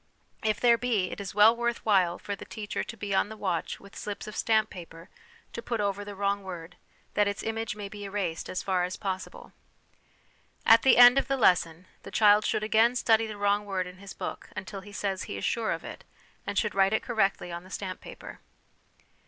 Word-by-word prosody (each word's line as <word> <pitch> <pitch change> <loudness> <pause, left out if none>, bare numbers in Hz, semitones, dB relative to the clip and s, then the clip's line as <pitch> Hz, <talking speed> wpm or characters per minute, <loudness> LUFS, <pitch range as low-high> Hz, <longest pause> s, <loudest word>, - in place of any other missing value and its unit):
If 215 -1 +1
there 235 -1 +4
be, 220 -7 0
it - - -6
is 195 -1 -7
well 215 +2 +7
worth 235 0 -2
while 185 -5 +3
for 205 - -5
the - - -10
teacher 215 -2 -5
to 230 - -9
be 205 -2 -4
on 195 - +2
the 220 - -9
watch 185 -5 -2
with 200 +1 -15
slips 205 -1 -6
of 215 - -8
stamp 220 -2 +2
paper 170 -1 -11 0.4
to 235 - -5
put 235 -1 -3
over 200 0 -1
the 205 0 -8
wrong 200 +1 0
word, 175 -3 -8 0.4
that 205 -1 +3
its 200 0 -3
image 225 -1 -3
may 205 -1 -6
be 205 0 -8
erased 195 -5 -3
as 185 - -3
far 185 -2 +1
as 180 +1 -3
possible. 190 -2 -6 1.1
At 225 +1 +7
the 265 - +5
end 245 +2 +9
of - - -3
the 275 - 0
lesson, 180 -6 +2 0.2
the - - -10
child 210 -1 +5
should 215 - 0
again 220 +3 +3
study 225 -2 +3
the 215 -1 -7
wrong 205 0 +1
word 190 -2 -1
in 180 0 -10
his 200 -1 -9
book - - -6
until 195 +1 -6
he 205 +2 -13
says 195 -2 -3
he 100 - -6
is 95 - -3
sure 230 -2 0
of - - -3
it, - - -9 0.4
and 200 - -3
should 210 +1 +1
write 195 +1 +3
it 220 - +1
correctly 200 -6 0
on 170 0 -6
the 185 - -15
stamp 190 -1 -5
paper. - - -10
205 Hz, 220 wpm, -28 LUFS, 190-220 Hz, 1.1 s, end